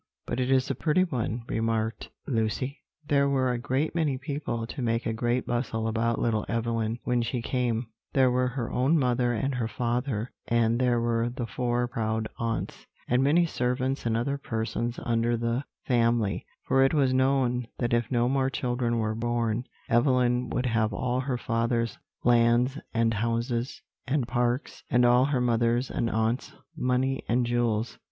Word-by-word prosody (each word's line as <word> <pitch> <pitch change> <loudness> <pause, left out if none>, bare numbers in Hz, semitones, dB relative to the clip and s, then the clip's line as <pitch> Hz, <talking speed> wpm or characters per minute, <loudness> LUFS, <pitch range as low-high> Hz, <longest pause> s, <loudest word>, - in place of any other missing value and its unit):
"But 120 - -3
it 130 0 0
is 135 0 +3
a - - +1
pretty 155 +7 +2
one," 120 -8 -2
remarked 115 0 -1 0.2
Lucy. 125 +3 -1 0.3
"There 140 -1 +3
were 130 -2 +2
a 120 - -2
great 135 +4 -1
many 155 -5 0
people 140 -4 -3
to 130 +4 -6
make 115 0 0
a 115 - 0
great 120 +2 0
bustle 115 -2 -1
about 115 +1 0
little 110 -2 0
Evelyn, 115 -1 -1
when 125 -1 +1
she 120 +2 -2
came: 120 0 -1 0.3
there 130 -2 +4
were 125 0 +2
her 125 -2 -3
own 135 +6 +3
mother 125 -3 +2
and 135 +4 -1
her 120 -3 -1
father, 120 0 -2 0.2
and 115 0 +2
there 125 -2 +2
were 115 0 +1
the 120 0 -4
four 120 +2 -1
proud 110 -3 -2
aunts, 115 -1 -3 0.2
and 125 +1 +2
many 160 +5 +4
servants 130 -2 -1
and 115 0 +1
other 140 +4 -1
persons 115 0 -3
under 115 0 +1
the 115 +4 -1 0.2
family, 115 -4 +1 0.2
for 135 - +4
it 135 +4 +3
was 135 -3 +3
known 130 -2 +2
that 120 -1 -1
if 120 -2 +1
no 120 -1 +2
more 135 0 +1
children 120 -3 -1
were 110 -1 0
born, 120 0 -1 0.2
Evelyn 125 0 +2
would 125 - -1
have 115 -2 +1
all 125 +3 -1
her 130 -1 -1
father's 115 0 -1 0.2
lands, 120 +3 +3
and 115 0 +2
houses, 115 +3 -2 0.2
and 135 -3 0
parks, 120 +2 -1
and 125 0 +4
all 125 +2 +5
her 140 -2 +1
mother's 120 +1 +1
and 115 -2 0
aunts' 110 +3 -1 0.2
money 130 +1 0
and 120 +1 +2
jewels. 120 -1 0
120 Hz, 170 wpm, -27 LUFS, 115-130 Hz, 0.3 s, all